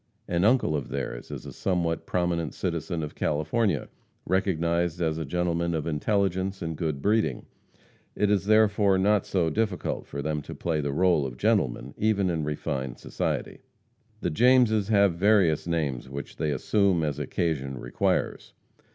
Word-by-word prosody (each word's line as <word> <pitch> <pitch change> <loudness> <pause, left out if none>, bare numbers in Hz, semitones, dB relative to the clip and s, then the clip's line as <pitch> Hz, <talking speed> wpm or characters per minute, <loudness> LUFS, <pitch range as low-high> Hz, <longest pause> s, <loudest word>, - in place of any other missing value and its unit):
An 85 0 0
uncle 110 -8 +3
of 70 -4 -3
theirs 65 -3 -5
is - - -7
a - - -8
somewhat 85 -3 -1
prominent 85 -3 -1
citizen 85 -2 -2
of 75 - -5
California, 80 - 0 0.4
recognized 85 -2 0
as 80 -2 0
a 80 - -3
gentleman 85 +2 -1
of 80 - -2
intelligence 95 +3 0
and 80 -1 -3
good 75 -4 -3
breeding. 110 +2 +1 0.7
It 105 0 +2
is, 100 -2 +1
therefore, 105 -2 +4
not 100 +1 +2
so 85 -4 +1
difficult 105 -1 -2
for 70 0 -5
them 75 0 -1
to - - -9
play 80 -3 -1
the 70 -1 -2
role 85 0 +3
of 65 -3 -5
gentlemen 70 - 0
even 100 -4 +2
in 80 -2 -1
refined 70 -3 -3
society. - - -3 0.6
The - - -1
Jameses 115 0 +4
have 100 -4 +4
various 90 -4 +3
names 75 -7 -2
which 70 0 -7
they 75 - -1
assume 95 +2 +2
as 75 -2 -2
occasion 70 -3 -2
requires. - - -1
85 Hz, 155 wpm, -27 LUFS, 75-100 Hz, 0.7 s, therefore